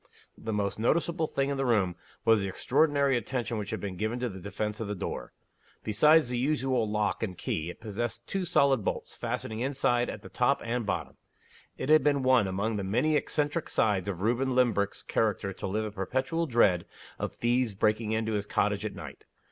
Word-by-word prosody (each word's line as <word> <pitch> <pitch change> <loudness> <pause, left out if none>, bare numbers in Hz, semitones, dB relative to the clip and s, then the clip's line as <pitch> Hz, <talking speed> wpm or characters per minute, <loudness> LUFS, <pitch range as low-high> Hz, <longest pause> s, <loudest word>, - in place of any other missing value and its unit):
The 110 - -5
most 105 -1 -1
noticeable 160 +6 +1
thing 140 -1 -1
in 140 - -2
the 135 - 0
room 100 -7 +2 0.3
was 115 -2 +5
the 100 - -2
extraordinary 140 +6 +2
attention 120 -1 -2
which 105 -1 -5
had - - -3
been 95 -3 -5
given 110 +4 -2
to 125 - 0
the 95 -2 -8
defense 105 +3 -4
of 110 - -3
the 105 - -3
door. 90 - -5 0.5
Besides 150 +6 +4
the 125 -1 -1
usual 130 -4 +1
lock 105 0 0
and 95 -5 -3
key, 80 +1 -2
it - - -9
possessed 115 +2 -4
two 195 +6 -2
solid 140 - +3
bolts, - - -3
fastening 110 0 -4
inside 125 -2 +1
at 105 - -7
the - - -9
top 135 +3 +2
and 120 0 -1
the - - -10
bottom. - - -3 0.6
It 130 - -4
had 155 -2 +6
been 140 -2 +2
one 130 -5 +4
among 100 +4 -1
the 100 - -2
many 125 +11 +1
eccentric 150 +2 0
sides 100 -3 +1
of 95 -3 -3
Reuben 125 +4 +1
Limbrick's 110 -6 +1
character 105 -3 0
to - - -5
live 110 +3 -1
in 105 - -4
perpetual 130 - -1
dread 105 - +3 0.3
of - - -3
thieves 120 -2 0
breaking 110 +2 +1
into 110 0 0
his 105 -1 -2
cottage - - +1
at - - -4
night. - - -9
115 Hz, 205 wpm, -29 LUFS, 105-130 Hz, 0.6 s, had